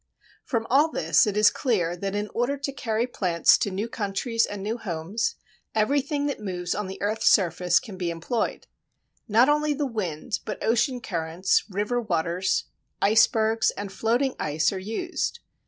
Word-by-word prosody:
From 230 Hz, -3 st, -2 dB
all 290 Hz, +5 st, +4 dB
this 265 Hz, -, +3 dB
it 210 Hz, 0 st, -1 dB
is 210 Hz, 0 st, +6 dB
clear 180 Hz, -, 0 dB
that 195 Hz, +2 st, -4 dB
in 205 Hz, 0 st, -1 dB
order 245 Hz, +4 st, 0 dB
to 280 Hz, 0 st, -3 dB
carry 230 Hz, -4 st, -1 dB
plants 180 Hz, -9 st, +3 dB
to -, -, 0 dB
new 200 Hz, +4 st, -3 dB
countries 230 Hz, +2 st, -1 dB
and 205 Hz, -1 st, -6 dB
new 225 Hz, +4 st, -3 dB
homes, 200 Hz, -, -2 dB, 0.4 s
everything 280 Hz, +6 st, +1 dB
that 285 Hz, -, -2 dB
moves 180 Hz, -4 st, -3 dB
on 210 Hz, -1 st, -3 dB
the 190 Hz, -, -7 dB
earth's 215 Hz, +2 st, +2 dB
surface 175 Hz, -2 st, +3 dB
can 190 Hz, +2 st, -10 dB
be 175 Hz, -2 st, -1 dB
employed. 170 Hz, +8 st, -2 dB, 0.6 s
Not 230 Hz, +4 st, +5 dB
only 300 Hz, 0 st, +2 dB
the 290 Hz, 0 st, -1 dB
wind, 210 Hz, -, -3 dB
but 210 Hz, -, -5 dB
ocean 240 Hz, +3 st, +1 dB
currents, 170 Hz, -2 st, 0 dB
river 210 Hz, +5 st, -1 dB
waters, 180 Hz, -2 st, 0 dB, 0.4 s
icebergs, 220 Hz, +1 st, +3 dB
and 200 Hz, -1 st, -5 dB
floating 245 Hz, +6 st, +1 dB
ice 155 Hz, +4 st, +1 dB
are 190 Hz, -, -3 dB
used. 345 Hz, -, -3 dB
215 Hz, 165 wpm, -25 LUFS, 185-245 Hz, 0.6 s, is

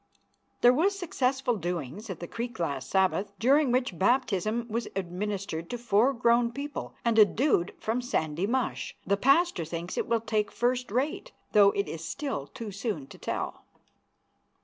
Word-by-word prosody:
There 245 Hz, +1 st, +7 dB
was 370 Hz, +9 st, +2 dB
a -, -, -8 dB
successful 265 Hz, -, 0 dB
doings 175 Hz, -, -4 dB
at 185 Hz, -, -5 dB
the 175 Hz, -, -6 dB
creek 235 Hz, +5 st, -5 dB
last 140 Hz, -7 st, -3 dB
Sabbath, 190 Hz, +1 st, +1 dB
during 275 Hz, +2 st, +4 dB
which 245 Hz, -9 st, 0 dB
baptism 225 Hz, 0 st, +1 dB
was 230 Hz, +1 st, -2 dB
administered 185 Hz, -2 st, -3 dB
to 245 Hz, -, -3 dB
four 235 Hz, +2 st, +3 dB
grown 235 Hz, -1 st, +3 dB
people 280 Hz, +3 st, -6 dB
and 230 Hz, -1 st, +3 dB
a -, -, +11 dB
dude 210 Hz, -, +1 dB
from 230 Hz, +3 st, -1 dB
Sandy 170 Hz, -, -1 dB
Mush. 255 Hz, +1 st, -2 dB
The 200 Hz, -, +2 dB
pastor 275 Hz, -, +3 dB
thinks 170 Hz, +2 st, -4 dB
it -, -, -1 dB
will 230 Hz, -2 st, +1 dB
take 215 Hz, -2 st, -1 dB
first 250 Hz, +1 st, 0 dB
rate, 275 Hz, -, -2 dB, 0.2 s
though 205 Hz, -1 st, +7 dB
it 200 Hz, -, -1 dB
is 165 Hz, 0 st, -6 dB
still 215 Hz, -, -4 dB
too 220 Hz, +4 st, -7 dB
soon 200 Hz, -, -3 dB
to -, -, -13 dB
tell. -, -, -4 dB
225 Hz, 170 wpm, -28 LUFS, 190-250 Hz, 0.2 s, a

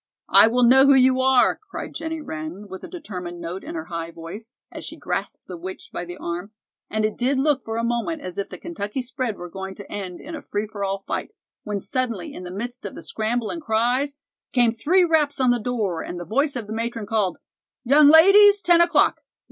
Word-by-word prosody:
"I -, -, +8 dB
will 245 Hz, +2 st, +2 dB
know 265 Hz, +3 st, +7 dB
who 280 Hz, -, +7 dB
you 260 Hz, 0 st, +4 dB
are," 260 Hz, -1 st, +4 dB
cried -, -, -6 dB
Jennie 320 Hz, -1 st, -4 dB
Wren, 160 Hz, -, -7 dB
with 190 Hz, -1 st, -9 dB
a -, -, -6 dB
determined 180 Hz, -, -7 dB
note 175 Hz, +3 st, -6 dB
in -, -, -7 dB
her 160 Hz, -1 st, -4 dB
high 165 Hz, -1 st, -5 dB
voice, 175 Hz, +9 st, -10 dB, 0.2 s
as -, -, -8 dB
she -, -, -8 dB
grasped -, -, -4 dB
the 180 Hz, -, -8 dB
witch 185 Hz, +3 st, -8 dB
by 175 Hz, -, -4 dB
the 175 Hz, +1 st, -8 dB
arm, 175 Hz, +5 st, -5 dB, 0.4 s
and 215 Hz, 0 st, 0 dB
it 215 Hz, -, -1 dB
did 260 Hz, +3 st, 0 dB
look 280 Hz, 0 st, +2 dB
for 225 Hz, -1 st, -5 dB
a 230 Hz, -, -1 dB
moment 240 Hz, +7 st, -1 dB
as 180 Hz, +1 st, -6 dB
if 200 Hz, -, -3 dB
the -, -, -8 dB
Kentucky 265 Hz, -7 st, -5 dB
spread 250 Hz, -3 st, -3 dB
were 175 Hz, -, -7 dB
going 190 Hz, +2 st, -7 dB
to 200 Hz, -, -11 dB
end 190 Hz, -3 st, -5 dB
in 325 Hz, -, -9 dB
a 310 Hz, -, -6 dB
free 205 Hz, -5 st, -3 dB
for 205 Hz, -1 st, -6 dB
all 195 Hz, 0 st, -2 dB
fight, -, -, -4 dB, 0.3 s
when 210 Hz, -2 st, -2 dB
suddenly, 235 Hz, -4 st, -3 dB
in -, -, -8 dB
the 180 Hz, -, -7 dB
midst 240 Hz, +7 st, -6 dB
of -, -, -6 dB
the -, -, -9 dB
scramble 225 Hz, +1 st, -2 dB
and 335 Hz, -, -5 dB
cries, 250 Hz, +4 st, 0 dB, 0.4 s
came 240 Hz, -3 st, +4 dB
three 345 Hz, +11 st, +3 dB
raps 305 Hz, -4 st, +1 dB
on 255 Hz, -2 st, +4 dB
the 245 Hz, -, +1 dB
door, 210 Hz, -8 st, -2 dB
and 175 Hz, -, -6 dB
the 175 Hz, -, -6 dB
voice 280 Hz, -, 0 dB
of 240 Hz, -4 st, -4 dB
the 215 Hz, -, -6 dB
matron 230 Hz, -1 st, -3 dB
called: 205 Hz, -5 st, 0 dB, 0.5 s
"Young 285 Hz, +4 st, +6 dB
ladies, 400 Hz, +6 st, +7 dB
ten 345 Hz, -1 st, +5 dB
o'clock. 340 Hz, -3 st, +3 dB
230 Hz, 230 wpm, -23 LUFS, 195-275 Hz, 0.5 s, I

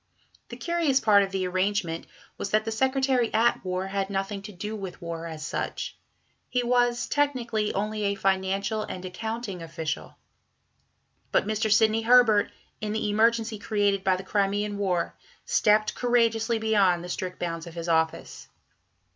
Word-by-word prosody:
The -, -, -8 dB
curious 335 Hz, -6 st, +1 dB
part 210 Hz, -4 st, +5 dB
of 195 Hz, -, 0 dB
the 190 Hz, -1 st, -1 dB
arrangement 185 Hz, -2 st, -1 dB, 0.3 s
was 200 Hz, -, -4 dB
that 215 Hz, +1 st, +2 dB
the 225 Hz, -, -2 dB
Secretary 260 Hz, 0 st, +1 dB
at 230 Hz, +2 st, +3 dB
War 185 Hz, 0 st, -2 dB
had 195 Hz, 0 st, -2 dB
nothing 195 Hz, +1 st, -3 dB
to 205 Hz, +2 st, -9 dB
do 210 Hz, +3 st, -5 dB
with 195 Hz, -4 st, -7 dB
war, 170 Hz, -1 st, -5 dB
as 155 Hz, -2 st, -6 dB
such; -, -, -4 dB, 0.5 s
he 250 Hz, -1 st, 0 dB
was, 245 Hz, -1 st, +2 dB
technically, 240 Hz, -7 st, 0 dB
only 210 Hz, +1 st, -1 dB
a 200 Hz, 0 st, +1 dB
financial 195 Hz, +2 st, 0 dB
and 185 Hz, -3 st, -6 dB
accounting 205 Hz, +1 st, -5 dB
official. 165 Hz, -1 st, -5 dB, 1.1 s
But -, -, +2 dB
Mr. 215 Hz, +1 st, 0 dB
Sidney 220 Hz, +1 st, +4 dB
Herbert, 225 Hz, -3 st, +5 dB, 0.3 s
in 215 Hz, -1 st, -3 dB
the 220 Hz, -1 st, -1 dB
emergency 225 Hz, 0 st, +2 dB
created 205 Hz, -2 st, +1 dB
by 190 Hz, -1 st, +3 dB
the 185 Hz, -, -6 dB
Crimean 205 Hz, +1 st, 0 dB
War, 180 Hz, -4 st, 0 dB, 0.3 s
stepped 215 Hz, 0 st, +3 dB
courageously 230 Hz, -2 st, +2 dB
beyond 200 Hz, -6 st, +2 dB
the -, -, -6 dB
strict 185 Hz, -1 st, -4 dB
bounds 165 Hz, -1 st, -4 dB
of 170 Hz, -, -10 dB
his 170 Hz, 0 st, -5 dB
office. 160 Hz, -1 st, -1 dB
205 Hz, 155 wpm, -26 LUFS, 185-225 Hz, 1.1 s, part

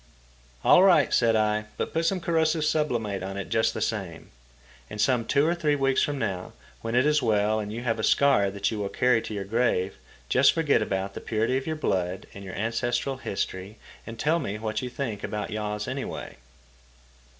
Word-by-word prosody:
"All -, -, +7 dB
right," 190 Hz, -2 st, +5 dB
said 115 Hz, -2 st, +3 dB
I; 105 Hz, 0 st, +1 dB
"but -, -, -3 dB
put 165 Hz, 0 st, +1 dB
some 190 Hz, +1 st, +1 dB
corrosive 160 Hz, -2 st, +1 dB
sublimate 120 Hz, -10 st, 0 dB
on 95 Hz, +1 st, -5 dB
it 100 Hz, -, -5 dB
just 110 Hz, -, +1 dB
the -, -, -3 dB
same. 95 Hz, -7 st, -4 dB, 0.6 s
And 105 Hz, -, -8 dB
some 120 Hz, 0 st, +2 dB
two 140 Hz, +4 st, +2 dB
or 165 Hz, -, +2 dB
three 155 Hz, -4 st, +1 dB
weeks 135 Hz, -1 st, +2 dB
from 145 Hz, -1 st, 0 dB
now, 95 Hz, -7 st, -3 dB, 0.3 s
when 115 Hz, +1 st, -3 dB
it 125 Hz, +3 st, +4 dB
is 150 Hz, 0 st, +3 dB
well 110 Hz, -1 st, +2 dB
and 105 Hz, -1 st, -4 dB
you 115 Hz, +2 st, -5 dB
have 115 Hz, -2 st, -1 dB
a -, -, -2 dB
scar 135 Hz, -9 st, +4 dB
that 100 Hz, +1 st, -2 dB
you 110 Hz, -, -3 dB
will 100 Hz, -1 st, -2 dB
carry 125 Hz, +2 st, +2 dB
to -, -, -8 dB
your 100 Hz, -, -3 dB
grave, 100 Hz, -3 st, 0 dB, 0.3 s
just 130 Hz, -, +5 dB
forget 160 Hz, -7 st, +2 dB
about 100 Hz, -1 st, -2 dB
the -, -, -7 dB
purity 115 Hz, +3 st, 0 dB
of 135 Hz, +2 st, -2 dB
your 160 Hz, -, -1 dB
blood 95 Hz, -, -1 dB
and 100 Hz, -, -9 dB
your 95 Hz, -2 st, -7 dB
ancestral 120 Hz, +4 st, -1 dB
history 100 Hz, -3 st, -4 dB, 0.3 s
and 115 Hz, 0 st, -7 dB
tell 160 Hz, +8 st, +1 dB
me 105 Hz, -9 st, -4 dB
what 110 Hz, 0 st, -3 dB
you 125 Hz, -, -4 dB
think 120 Hz, -5 st, -4 dB
about 105 Hz, -1 st, -4 dB
yaws 105 Hz, 0 st, -3 dB
anyway." 130 Hz, -, -5 dB
115 Hz, 205 wpm, -26 LUFS, 105-140 Hz, 0.6 s, All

